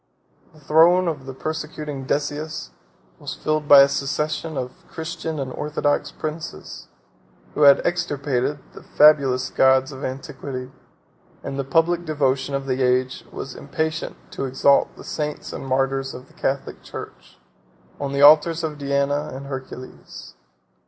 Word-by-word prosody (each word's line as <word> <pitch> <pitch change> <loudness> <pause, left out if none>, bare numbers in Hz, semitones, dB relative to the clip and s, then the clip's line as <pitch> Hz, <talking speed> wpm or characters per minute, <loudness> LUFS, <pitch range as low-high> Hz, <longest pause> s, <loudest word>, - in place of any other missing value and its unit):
The 155 - -19
throne 165 +5 +4
of 145 -5 -3
the 135 - -6
persecuting 150 -2 -5
Decius 150 - -3 0.5
was - - -6
filled 155 -1 -1
by 140 -1 +10
a 140 - +7
succession 150 +3 -2
of 125 -1 -6
Christian 160 -1 -5
and 130 -2 -4
orthodox 145 -1 -1
princes, 155 +2 -7 0.7
who - - -3
had 140 -1 +7
extirpated 145 -5 -1 0.2
the - - -11
fabulous 135 -4 +4
gods 130 +1 +4
of 135 +1 -9
antiquity: 130 0 -6 0.7
and 135 - -5
the - - 0
public 165 +5 +2
devotion 140 -3 0
of 135 0 -3
the 130 0 -1
age 130 0 +1
was 135 - -6
impatient 160 +2 -3 0.2
to - - -3
exalt 135 +2 +3
the - - -12
saints 150 -1 -4
and 135 - -6
martyrs 135 +1 0
of 125 - -10
the - - -23
Catholic 135 0 -3
church, - - -10 0.6
on 140 -1 -3
the 140 0 +1
altars 155 +3 +6
of 150 -2 -4
Diana 140 +1 0
and 135 +2 -7
Hercules. 130 -2 -9
140 Hz, 145 wpm, -22 LUFS, 135-155 Hz, 0.7 s, by